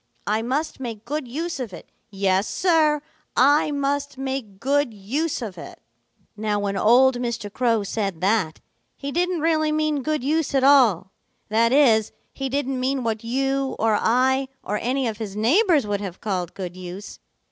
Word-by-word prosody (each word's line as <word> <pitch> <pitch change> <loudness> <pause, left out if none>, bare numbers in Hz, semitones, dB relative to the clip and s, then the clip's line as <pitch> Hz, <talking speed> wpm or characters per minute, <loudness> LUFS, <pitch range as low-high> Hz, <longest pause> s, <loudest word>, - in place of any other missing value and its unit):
I 215 +2 0
must 265 +7 -2
make 230 -4 -6
good 290 +1 -3
use 325 +6 -4
of 235 -7 -5
it. 175 - -11 0.2
Yes, 195 0 +1
Sir, 310 -5 +2 0.3
I 290 +4 +5
must 285 -1 -2
make 265 -7 -4
good 275 -2 +1
use 265 +9 -2
of 190 -6 -7
it.' - - -10 0.6
"Now 210 0 -1
when 200 -1 -2
old 245 +5 +5
Mr. 235 -4 -4
Crow 230 -4 +1
said 200 -4 -3
that, 190 -3 0 0.4
he 280 0 -5
didn't 355 +1 0
really 310 -1 +2
mean 305 -2 0
good 305 -1 -1
use 305 +1 0
at 265 - +3
all. 250 -10 +5 0.4
That 230 +2 +3
is, 235 -6 +4 0.2
he 270 -1 -4
didn't 270 -1 -1
mean 260 0 -1
what 225 -1 -2
you 270 +3 -1
or 225 -1 +2
I 260 +5 +2 0.2
or 210 +2 -2
any 255 +2 0
of 220 -2 -3
his 205 -3 -5
neighbors 300 - +3
would 205 -1 -2
have 190 -3 -6
called 185 -5 -3
good 180 -2 -6
use. 185 +2 -8
250 Hz, 170 wpm, -23 LUFS, 210-285 Hz, 0.6 s, I